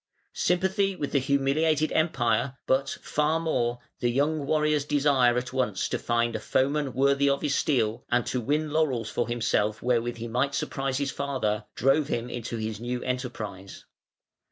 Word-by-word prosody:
Sympathy 190 +2 +1
with 145 -5 -4
the 140 - +3
humiliated 140 +3 +1
Empire, 130 -5 +1
but, 135 +1 +1
far 150 +2 +1
more, 120 -7 0 0.2
the 120 - +1
young 145 +3 0
warrior's 150 -1 +2
desire 140 -4 +3
at 125 0 -3
once 125 -7 0
to - - -1
find 120 0 0
"a - - -1
foeman 140 +4 0
worthy 140 +1 +3
of 140 +1 0
his 145 -2 +1
steel", 115 -7 +1
and 120 -1 +2
to 125 - -2
win 150 +5 0
laurels 130 -8 0
for 120 - -1
himself 110 -3 0
wherewith 120 -1 0
he 115 +1 -5
might 130 +4 0
surprise 135 -1 -2
his 140 -1 -1
father, 115 -7 -2
drove 135 +3 +3
him 120 -3 -3
into 120 -1 -4
his 110 -1 -4
new 120 +1 -3
enterprise. 120 -7 -5
130 Hz, 165 wpm, -27 LUFS, 120-145 Hz, 0.2 s, the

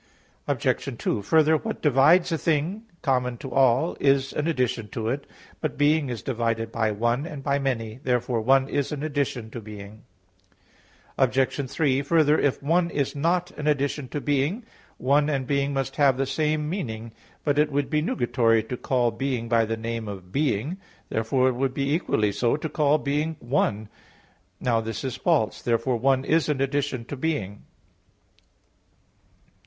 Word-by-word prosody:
Obj. - - -1
2: - - -1
Further, 160 +7 +4
what 220 +7 -5
divides 150 +6 +5
a 165 - +1
thing 165 +9 0 0.2
common 125 -4 0
to 135 +2 -8
all, 125 -8 +3
is 135 -1 +2
an 150 - -1
addition 125 -7 0
to 110 +2 -3
it. 140 +3 -3 0.3
But 155 -4 -3
"being" 145 -1 +3
is 120 -2 -5
divided 115 -2 -1
by 110 -1 0
"one" 120 +7 0
and 145 -5 -8
by 140 0 +1
"many." 120 -4 -2
Therefore 125 -2 0
"one" 135 +3 +4
is 140 -1 -1
an 150 -1 -4
addition 140 -7 -2
to 120 - -6
"being." 105 0 -10 1.2
Obj. 130 +1 +1
3: 140 -1 +1
Further, 155 +1 +3
if 140 -1 0
"one" 170 +4 +2
is 140 -2 -2
not 175 +4 0
an 150 - -5
addition 140 -1 0
to 145 - -4
"being," 145 - 0 0.3
"one" 145 +3 +2
and 135 -3 -1
"being" 140 +1 0
must 135 -1 -3
have 140 -3 +4
the 135 - +1
same 150 +2 0
meaning. 115 - -4 0.3
But 145 -1 +1
it 150 0 +3
would 145 +1 -1
be 150 -1 +2
nugatory 120 -6 +2
to 125 - -3
call 120 -2 +1
"being" 125 0 -2
by 115 -1 +3
the 115 +1 -3
name 115 0 -4
of 95 -3 -8
"being"; 140 - 0 0.3
therefore 125 +4 +1
it - - -1
would 130 +1 -1
be 140 +1 0
equally 110 - +1
so 115 +6 +1
to 155 - -4
call 150 0 +3
being 150 +3 -1
"one." 110 -4 0 0.7
Now 115 -2 +1
this 115 +3 -5
is 130 -2 -3
false. 125 - +1
Therefore 120 +1 0
"one" 130 +2 +2
is 160 0 +2
an 145 -3 0
addition 135 -3 -1
to 145 - -6
"being." 125 -9 -3
135 Hz, 170 wpm, -25 LUFS, 115-150 Hz, 1.2 s, divides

